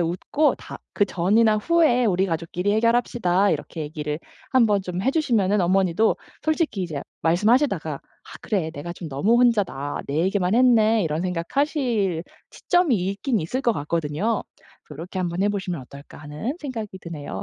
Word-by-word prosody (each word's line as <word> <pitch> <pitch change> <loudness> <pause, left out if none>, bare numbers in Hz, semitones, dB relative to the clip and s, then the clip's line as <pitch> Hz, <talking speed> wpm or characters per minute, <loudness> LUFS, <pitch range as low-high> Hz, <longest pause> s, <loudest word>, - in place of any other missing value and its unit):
웃고 180 - +1
다 - - -10
"그 205 - +2
전이나 215 +5 +3
후에 280 -2 +3
우리 190 -2 +2
가족끼리 175 +3 -2
해결합시다." 220 -4 +2
이렇게 160 +1 -4
얘기를 150 0 -4 0.3
한번 220 -6 +3
좀 180 -1 -6
해 265 - +3
주시면은 215 - +1
어머니도 190 +3 +2 0.3
솔직히 315 - 0
이제 155 -5 -4 0.2
말씀하시다가 190 - +2
'아 - - -15
그래 180 -7 -1
내가 165 +2 -7
좀 170 -2 -8
너무 175 - +2
혼자다. 195 - +1
내 140 - -3
얘기만 190 +2 +1
했네.' 225 -3 +4
이런 160 +1 -1
생각 180 +5 -4
하실 235 - +1 0.3
시점이 350 -8 +1
있긴 200 +6 -1
있을 245 +12 -2
것 235 - +3
같거든요. 165 +7 -1 0.4
그래서 150 - -12
'요렇게 180 +3 -6
한번 175 +1 -1
해 205 - +3
보시면 190 -6 -3
어떨까.' 140 +3 -13
하는 150 - -5
생각이 240 -7 -5
드네요. 145 - -6
195 Hz, 370 characters per minute, -23 LUFS, 165-230 Hz, 0.4 s, 했네